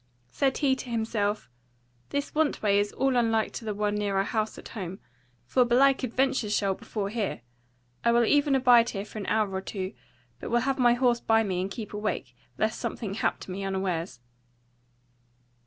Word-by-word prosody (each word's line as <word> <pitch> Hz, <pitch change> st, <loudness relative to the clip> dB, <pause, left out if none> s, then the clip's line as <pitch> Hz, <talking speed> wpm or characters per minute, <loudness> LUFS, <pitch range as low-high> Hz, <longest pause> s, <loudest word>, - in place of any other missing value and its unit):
Said 270 Hz, -, +1 dB
he 275 Hz, -3 st, +2 dB
to 255 Hz, -, -7 dB
himself; 220 Hz, -, -1 dB, 0.6 s
This 285 Hz, 0 st, -3 dB
want 305 Hz, -5 st, +1 dB
way 200 Hz, -1 st, +4 dB
is 205 Hz, 0 st, 0 dB
all 270 Hz, -1 st, +1 dB
unlike 225 Hz, -2 st, +2 dB
to 230 Hz, -, -7 dB
the 215 Hz, -, -2 dB
one 205 Hz, 0 st, 0 dB
near 205 Hz, -2 st, -1 dB
our 195 Hz, -, +3 dB
house 215 Hz, +1 st, -2 dB
at -, -, -10 dB
home: 190 Hz, -4 st, -6 dB, 0.5 s
for 250 Hz, -, +3 dB
belike 265 Hz, +3 st, +4 dB
adventures 255 Hz, -3 st, +1 dB
shall 195 Hz, -2 st, +1 dB
befall 205 Hz, +2 st, -5 dB
here: 200 Hz, -, -2 dB, 0.6 s
I 235 Hz, -, +4 dB
will 235 Hz, 0 st, +4 dB
even 290 Hz, +2 st, +3 dB
abide 245 Hz, -3 st, +5 dB
here 200 Hz, -1 st, -4 dB
for 215 Hz, -, -8 dB
an 200 Hz, -, -5 dB
hour 215 Hz, -3 st, +1 dB
or 190 Hz, -, -2 dB
two; 190 Hz, -1 st, -5 dB, 0.5 s
but -, -, -6 dB
will 240 Hz, +1 st, +2 dB
have 270 Hz, +1 st, -1 dB
my 240 Hz, -1 st, +5 dB
horse 245 Hz, -1 st, +2 dB
by 225 Hz, -1 st, +3 dB
me 185 Hz, -3 st, -1 dB
and 190 Hz, -, -2 dB
keep 215 Hz, +1 st, -7 dB
awake, 205 Hz, -, -3 dB, 0.2 s
lest 220 Hz, +1 st, 0 dB
something 210 Hz, -5 st, -4 dB
hap 215 Hz, -, 0 dB
to -, -, -8 dB
me 195 Hz, +2 st, -4 dB
unawares. 185 Hz, -8 st, -2 dB
220 Hz, 190 wpm, -27 LUFS, 200-245 Hz, 0.6 s, abide